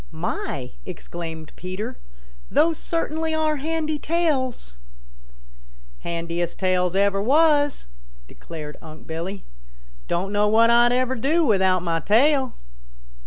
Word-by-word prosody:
"My!" - - -4
exclaimed 160 - -7
Peter. 205 +7 -5 0.5
"Those 325 0 +2
certainly 320 -1 -1
are 310 -1 +1
handy 310 +1 -2
tails." 285 - -1 1.2
"Handiest 170 0 -3
tails 185 -1 +1
ever 200 0 +2
was," 290 +4 +3 0.4
declared 150 - -9
Unc' 155 -1 -12
Billy. 175 +5 -5 0.6
"Don't 185 +3 -1
know 205 0 +2
what 225 +2 +5
Ah 240 0 +6
ever 255 +1 +1
would 245 - -6
do 320 +5 +2
without 190 - +3
mah 165 -1 0
tail." 260 - +3
220 Hz, 115 wpm, -23 LUFS, -, 1.2 s, Ah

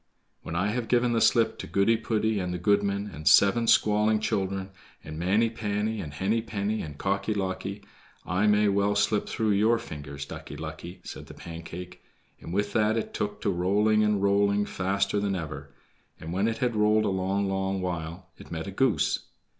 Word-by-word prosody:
"When 80 - -6
I 95 +4 +1
have 115 +1 -2
given 120 0 +2
the 115 - +2
slip 115 -1 +3
to - - -6
Goody 100 +4 +3
poody, 110 -1 0
and 90 -1 -2
the 90 - -2
goodman, 100 +2 +1
and 75 +1 -6
seven 115 +8 +5
squalling 105 0 +4
children, 95 -3 -2 0.3
and 75 +1 -7
Manny 100 +7 +3
panny, 105 0 -2
and 75 - -6
Henny 100 +9 0
penny, 110 -1 -2
and 75 -2 -7
Cocky 100 +4 -1
locky, 100 +1 -3 0.4
I 95 +4 +1
may 105 0 +4
well 100 +1 +2
slip 105 +1 +1
through 110 -1 0
your 110 +4 +3
fingers, 70 -9 -7
Ducky 70 0 -8
lucky," 80 +4 -8
said - - -9
the - - -11
Pancake, 85 +2 -9 0.4
and - - -9
with 100 +3 -1
that 110 +1 +2
it 110 - -3
took 105 0 -3
to 100 - +1
rolling 105 +4 +2
and 105 -2 +1
rolling 100 +1 +3
faster 100 +2 0
than 100 -1 -1
ever; 75 -5 -6 0.5
and 80 +2 -6
when 100 +4 +1
it 115 0 -1
had 120 -3 0
rolled 105 0 +3
a - - +1
long, 95 +1 0
long 95 0 -1
while, 85 -1 -4
it - - -12
met 80 -1 -4
a 100 - -5
goose. 130 +4 +1
100 Hz, 190 wpm, -27 LUFS, 90-105 Hz, 0.5 s, seven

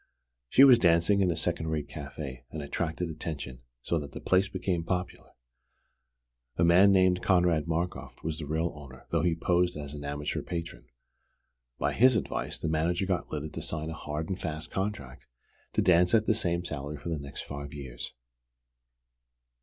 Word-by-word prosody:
She 135 - +7
was 130 -4 +9
dancing 90 +2 +4
in 95 - +3
a 85 - +1
second 80 -1 -1
rate 80 -2 -2
café, 70 -3 -7
and 75 +1 -5
attracted 80 +4 -2
attention, 75 -5 -6 0.2
so 85 - 0
that 70 -1 -8
the - - -6
place 95 +1 +3
became 95 -3 -2
popular. 90 +1 -4 1.2
A 85 - +3
man 90 +4 +7
named 95 -1 +4
Konrad 90 -4 +3
Markoff 85 +2 -3
was 80 0 -3
the 75 - -5
real 80 +3 0
owner, 70 -3 -12
though 85 - +2
he 85 0 +2
posed 90 0 +1
as 75 -1 -6
an 75 -1 -7
amateur 75 +1 -3
patron. 85 -1 -6 0.9
By - - 0
his 130 +1 +5
advice, 110 - -2
the - - -3
manager 85 +4 +1
got 90 -2 -1
Lyda 75 0 -3
to - - -6
sign 80 0 -3
a - - -4
hard 75 0 -4
and 95 - -4
fast 80 -1 -4
contract 95 -10 -4 0.5
to - - +2
dance 90 +3 +5
at 110 -1 +3
the 110 - +3
same 85 -5 0
salary 75 -1 -5
for 80 - -6
the 80 -2 -2
next 70 0 -6
five 70 0 -7
years. 65 -4 -7
80 Hz, 175 wpm, -29 LUFS, 75-90 Hz, 1.2 s, was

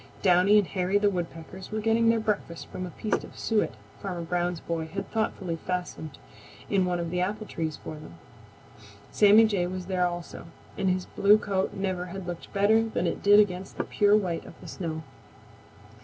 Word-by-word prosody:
Downy 185 +2 +5
and 205 - +4
Hairy 185 +2 0
the 205 0 +3
Woodpeckers 175 +1 -6
were 215 - -1
getting 225 +1 +3
their 230 0 +3
breakfast 210 -6 -2
from 185 - -5
a - - -7
piece 215 +5 -2
of - - -12
suet 220 -2 0 0.3
Farmer 180 -4 -4
Brown's 175 0 -1
boy 165 -1 -3
had 195 +5 -6
thoughtfully 195 -6 -2
fastened 175 -4 -5 0.5
in 190 -2 +3
one 180 -1 -1
of 170 -1 -3
the 180 0 0
apple 210 +4 -2
trees 160 -5 -4
for - - -8
them. 150 - -11 1.0
Sammy 210 +2 +7
Jay 195 -5 0
was 185 0 -5
there 180 -1 +1
also, 175 -1 -7 0.3
and 190 - 0
his 185 0 0
blue 205 +1 +4
coat 195 -3 -1
never 185 -2 -2
had 190 +1 -7
looked 175 -1 -7
better 210 +2 +4
than - - -1
it - - -2
did 205 +1 +7
against 190 -2 0
the - - 0
pure 205 0 +3
white 180 -5 -2
of - - -13
the - - -11
snow. 160 -3 -5
185 Hz, 190 wpm, -27 LUFS, 175-205 Hz, 1.0 s, Sammy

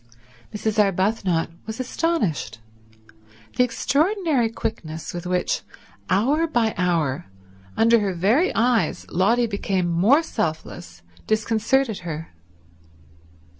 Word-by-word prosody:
Mrs. 215 +1 -2
Arbuthnot 190 -3 0 0.2
was 220 +3 -6
astonished. 245 - -1 1.0
The 250 - +4
extraordinary 290 - +1
quickness 175 -9 -5
with 175 0 -5
which, 180 - 0 0.5
hour 275 - +2
by 235 -7 +1
hour, 170 -4 0 0.5
under 230 +1 +5
her 195 -3 -1
very 220 - +2
eyes, 230 -6 +1
Lotty 230 +7 +3
became 200 -4 -1
more 200 - +4
selfless, 160 - -4 0.2
disconcerted 220 +2 +1
her. 165 -2 -6
215 Hz, 95 wpm, -23 LUFS, 175-245 Hz, 1.0 s, under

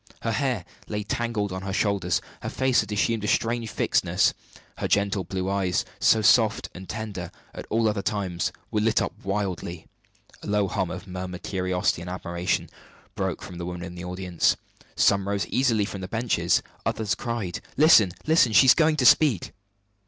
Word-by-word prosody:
Her 115 - 0
hair 115 -5 -1 0.2
lay 105 -1 -3
tangled 105 -1 -2
on 95 0 -4
her 95 0 -4
shoulders; 100 -3 0 0.2
her - - -4
face 130 -1 +2
had - - -7
assumed 105 +1 0
a - - -1
strange 115 +1 0
fixedness; - - +2 0.5
her - - -1
gentle 100 -1 +1
blue 95 +1 -3
eyes, 95 -2 0
so 110 -1 +4
soft 110 +2 +4
and 95 +1 -10
tender 105 -6 -5 0.2
at - - -8
all 115 0 +2
other 105 -2 0
times, 95 -3 -2 0.2
were 105 - +1
lit 110 +1 +3
up - - -2
wildly. 95 -4 -3 0.6
A - - -9
low 105 -1 +1
hum 95 -1 -1
of 90 +1 -6
murmured 90 -1 -6
curiosity 90 -2 0
and 90 - -7
admiration 90 0 -2 0.5
broke - - -3
from 90 - -8
the 85 - -4
women 90 0 -5
of 90 - -11
the 90 0 -7
audience. 90 -1 0 0.4
Some 100 -1 +3
rose 100 -1 0
eagerly 115 -6 +2
from 100 -2 -6
the 90 - -5
benches; 115 -6 +1 0.2
others 105 -2 -1
cried: 110 -7 -4 0.2
"Listen, 135 - +6
listen! 155 -8 +4
she 135 - +7
is 130 - +9
going 160 -1 +3
to 135 -4 0
speak!" 130 - +4
100 Hz, 180 wpm, -25 LUFS, 90-115 Hz, 0.6 s, is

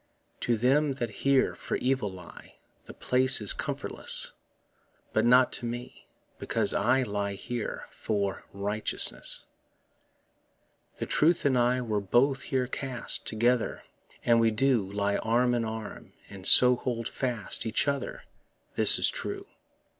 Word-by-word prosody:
To 120 -1 0
them 135 +5 +2
that 120 -4 -4
here 140 -1 +3
for - - -5
evil 130 -4 0
lie 90 -2 -13 0.3
The - - -11
place 130 +1 +3
is 105 -2 +4
comfortless, - - -2 0.8
But 110 - +2
not 125 +1 +5
to 120 - -3
me, 120 +1 -8 0.3
because - - +1
that - - 0
I 130 +1 +3
Lie 100 -3 -3
here 120 +3 -5
for 100 -3 -3
righteousness. 105 +2 0 1.5
The - - -4
truth 165 +1 +2
and 135 -2 +3
I 125 +1 +2
were 110 -4 -2
both 130 +7 +2
here 130 -2 -1
cast 130 -1 -3
Together, 120 +2 0 0.4
and 115 -1 +4
we 115 0 +4
do 110 -3 +1
Lie 100 0 0
arm 120 +2 +1
in 120 -1 0
arm, 110 -1 -7 0.2
and 95 -2 -7
so 125 0 +6
hold 115 -2 -3
fast 120 -3 -2
Each 110 +5 0
other; 140 -1 -3 0.5
this - - +4
is - - +4
true. - - -1
120 Hz, 140 wpm, -28 LUFS, 110-130 Hz, 1.5 s, so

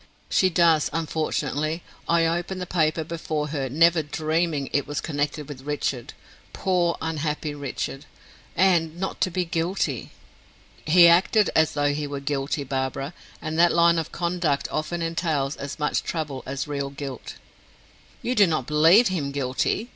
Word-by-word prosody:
"She 185 - +4
does, 165 -3 +3
unfortunately. 155 0 -2 0.3
I 170 0 +4
opened 175 +3 -1
the 180 - -3
paper 160 -2 +1
before 155 -2 -3
her, 140 -3 -2
never 165 +4 +4
dreaming 155 0 -1
it 145 - +1
was 145 - -3
connected 145 -1 -3
with 140 -3 -8
Richard 140 -3 -3 0.4
poor, 180 -3 +1
unhappy 155 -1 -2
Richard! 140 0 -5 0.5
and 170 -3 +2
not 190 - -4
to - - +3
be 180 0 -1
guilty." 165 - -2 0.8
"He 170 +2 +7
acted 185 +5 +4
as 160 -1 +3
though 145 -1 +1
he 150 0 -3
were 140 -1 -4
guilty, 140 +1 -2
Barbara; 135 +2 -3 0.3
and 160 +1 -2
that 170 0 +5
line 170 0 +4
of 160 - -5
conduct 170 -5 -1
often 165 +2 -2
entails 160 -4 -1
as 140 +1 -6
much 150 -1 0
trouble 150 -5 -4
as 135 +2 -3
real 140 -1 -3
guilt." 140 -2 -7 0.9
"You 250 - 0
do 205 -5 +5
not 155 -6 -1
believe 165 - +5
him 160 -7 -2
guilty?" 140 - -1
155 Hz, 155 wpm, -24 LUFS, 145-170 Hz, 0.9 s, He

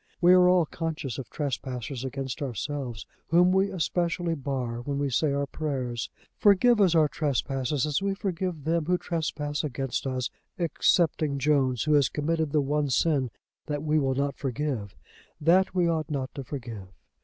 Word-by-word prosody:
We 175 +1 +6
are 180 0 +6
all 180 -2 +4
conscious 155 -5 -4
of 130 - -7
trespassers 130 -3 -4
against 135 +2 -4
ourselves 130 -2 -4 0.2
whom 175 +2 +5
we 190 +1 +3
especially 175 0 -1
bar 130 -5 -3
when 140 +3 -3
we 140 -1 -1
say 145 +4 +2
our 140 0 0
prayers. 130 -6 -3 0.3
Forgive 210 +3 +5
us 180 -4 +4
our 155 -2 +5
trespasses, 135 -1 -1
as 150 +3 0
we 195 0 0
forgive 180 -5 -3
them 165 +1 0
who 180 +2 +2
trespass 150 -4 -2
against 135 -1 -2
us, 130 -1 -2 0.3
excepting 160 -3 +2
Jones 135 -3 +2
who 150 - +2
has 145 -3 +4
committed 160 0 -1
the 150 - +3
one 145 +1 0
sin 135 0 +2 0.4
that 145 -1 -2
we 155 0 +2
will 135 -2 +1
not 140 +1 0
forgive, 130 -6 -3 0.4
that 180 +5 +3
we 180 -2 +3
ought 160 -3 -1
not 135 -3 -3
to 140 - -6
forgive. 115 -8 -7
145 Hz, 165 wpm, -27 LUFS, 135-165 Hz, 0.4 s, We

